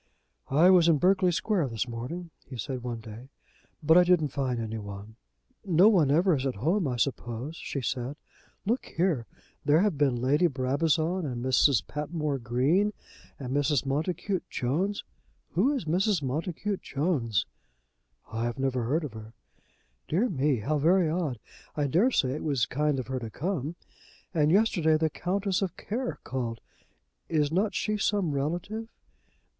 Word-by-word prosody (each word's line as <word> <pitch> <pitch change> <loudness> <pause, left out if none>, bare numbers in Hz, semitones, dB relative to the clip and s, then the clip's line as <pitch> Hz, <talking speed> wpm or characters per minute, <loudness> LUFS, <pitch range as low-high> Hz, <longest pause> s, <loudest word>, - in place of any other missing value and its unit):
"I 160 +7 +6
was 175 -3 +6
in 165 -3 +5
Berkeley 185 +2 +3
Square 175 -2 0
this 115 0 -3
morning," 130 +9 -6 0.2
he 130 - -8
said 125 +3 -4
one 120 -2 -5
day, 115 +4 -10 0.5
"but 160 +3 +6
I - - +7
didn't 175 -4 +3
find 130 -3 -2
any 110 -1 -4
one." 100 +1 -9 0.5
"Nobody 180 -4 +5
ever 170 +3 +4
is 135 0 -1
at 130 - -2
home, 165 - +1
I 125 - -1
suppose," 125 +3 -2
she 140 - -4
said. 130 +2 -3 0.5
"Look 235 +6 0
here. 165 -9 0 0.4
There 150 +3 +4
have 195 -8 +1
been 140 -4 +3
Lady 140 +8 +3
Brabazon, 155 +6 0
and 120 -2 -4
Mrs. 130 -2 +4
Patmore 150 -1 -3
Green, 135 - +1 0.4
and 130 -2 -5
Mrs. 145 -1 +2
Montacute 170 +7 -2
Jones. 175 +11 -1 0.5
Who 205 - +2
is 270 - -2
Mrs. 180 +1 +1
Montacute 170 +8 -2
Jones?" 135 - 0 0.9
"I 115 +2 -1
never 130 -3 0
heard 155 +7 0
of 140 -7 -6
her." 110 0 -10 0.7
"Dear 205 +11 +1
me; 140 - +1
how 150 +7 0
very 170 +2 +3
odd. 160 -7 -1 0.4
I 145 - 0
dare 175 - +3
say 130 - +1
it 145 - -4
was 140 -7 +1
kind 150 +2 0
of 130 - -3
her 130 0 -3
to 115 -2 -6
come. 160 - -3 0.6
And 150 -3 +3
yesterday 175 -6 +3
the 160 -1 0
Countess 195 +1 -1
of 190 -3 -2
Care 250 +4 -3
called. 120 -3 -3 0.7
Is 150 -3 +1
not 200 +5 +1
she 210 -1 0
some 200 -5 +1
relative?" 175 +10 -3
150 Hz, 160 wpm, -28 LUFS, 130-180 Hz, 0.9 s, I